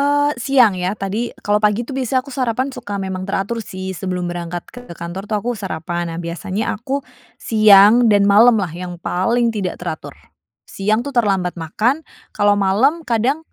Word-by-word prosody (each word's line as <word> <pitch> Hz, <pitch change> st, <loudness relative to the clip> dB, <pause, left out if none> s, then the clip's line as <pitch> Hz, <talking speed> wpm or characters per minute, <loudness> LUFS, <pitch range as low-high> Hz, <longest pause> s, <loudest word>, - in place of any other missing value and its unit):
Eee, 290 Hz, +1 st, +2 dB
siang 250 Hz, -7 st, +4 dB
ya, 185 Hz, -, 0 dB
tadi, 200 Hz, +4 st, -1 dB, 0.2 s
kalau 205 Hz, 0 st, +2 dB
pagi 210 Hz, +2 st, +3 dB
itu 275 Hz, -, -8 dB
biasanya 260 Hz, 0 st, 0 dB
aku 280 Hz, -, -15 dB
sarapan 255 Hz, +1 st, 0 dB, 0.4 s
memang 185 Hz, 0 st, -4 dB
teratur 205 Hz, +4 st, -2 dB
sih, 185 Hz, 0 st, -6 dB
sebelum 180 Hz, -1 st, -3 dB
berangkat 175 Hz, 0 st, -5 dB
ke 245 Hz, -, -9 dB, 0.2 s
kantor 170 Hz, +3 st, -5 dB
tuh 215 Hz, -, 0 dB
aku 240 Hz, -, -2 dB
sarapan. 175 Hz, -1 st, -3 dB
Nah, 165 Hz, -, -6 dB
biasanya 190 Hz, +5 st, -3 dB
aku 260 Hz, +5 st, -3 dB, 0.5 s
siang 210 Hz, -1 st, +7 dB, 0.2 s
dan 205 Hz, -, +4 dB
malam 225 Hz, +3 st, +6 dB
lah, 180 Hz, -, -2 dB
yang 180 Hz, -1 st, -5 dB
paling 230 Hz, +7 st, +1 dB
tidak 185 Hz, -3 st, -2 dB
teratur. -, -, -5 dB, 0.6 s
Siang 210 Hz, +3 st, +1 dB
itu 285 Hz, -, -6 dB
terlambat 195 Hz, -6 st, +1 dB
makan. 225 Hz, -, +1 dB, 0.4 s
Kalau 205 Hz, -1 st, +4 dB
malem 215 Hz, +10 st, +3 dB, 0.2 s
kadang 240 Hz, +6 st, +1 dB
205 Hz, 170 wpm, -19 LUFS, 185-240 Hz, 0.6 s, siang